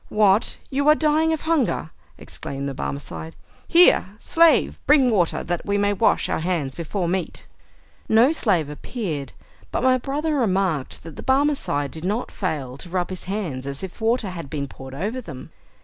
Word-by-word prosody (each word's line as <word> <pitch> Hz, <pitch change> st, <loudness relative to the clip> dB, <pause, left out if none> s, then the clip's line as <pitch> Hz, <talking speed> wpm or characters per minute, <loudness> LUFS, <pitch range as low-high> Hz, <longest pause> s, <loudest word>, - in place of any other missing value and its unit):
"What, 210 Hz, 0 st, +3 dB
you 280 Hz, +2 st, 0 dB
are 305 Hz, -, +7 dB
dying 315 Hz, +1 st, +2 dB
of 320 Hz, -, -1 dB
hunger?" 305 Hz, -, 0 dB, 0.3 s
exclaimed 140 Hz, 0 st, -6 dB
the 140 Hz, -, -3 dB
Barmecide. 80 Hz, -, -6 dB, 0.3 s
"Here, 350 Hz, +1 st, +6 dB
slave; 325 Hz, +2 st, +3 dB
bring 275 Hz, -4 st, +5 dB
water, 180 Hz, -6 st, +1 dB
that 175 Hz, -1 st, -3 dB
we 200 Hz, 0 st, 0 dB
may 205 Hz, 0 st, +2 dB
wash 195 Hz, -, +2 dB
our -, -, -1 dB
hands 160 Hz, -5 st, -1 dB
before 175 Hz, +3 st, -3 dB
meat!" 180 Hz, 0 st, -3 dB, 0.6 s
No 230 Hz, +6 st, +5 dB
slave 195 Hz, -, +1 dB
appeared, 150 Hz, -, -5 dB, 0.4 s
but -, -, -1 dB
my 255 Hz, 0 st, +4 dB
brother 295 Hz, +5 st, -2 dB
remarked 190 Hz, -, 0 dB
that 165 Hz, -2 st, -10 dB
the -, -, -7 dB
Barmecide 265 Hz, -, +1 dB
did 160 Hz, -, -8 dB
not 210 Hz, +6 st, -2 dB
fail 140 Hz, -9 st, -3 dB
to 175 Hz, -, -8 dB
rub 180 Hz, +1 st, -2 dB
his 185 Hz, -, -6 dB
hands 175 Hz, -10 st, -4 dB
as 140 Hz, +3 st, -3 dB
if 190 Hz, -, -7 dB
the -, -, -8 dB
water 225 Hz, -3 st, +1 dB
had 165 Hz, -6 st, -7 dB
been 140 Hz, -1 st, -3 dB
poured 135 Hz, 0 st, -10 dB
over 215 Hz, -, -3 dB
them. 140 Hz, -, -10 dB
190 Hz, 180 wpm, -23 LUFS, -, 0.6 s, are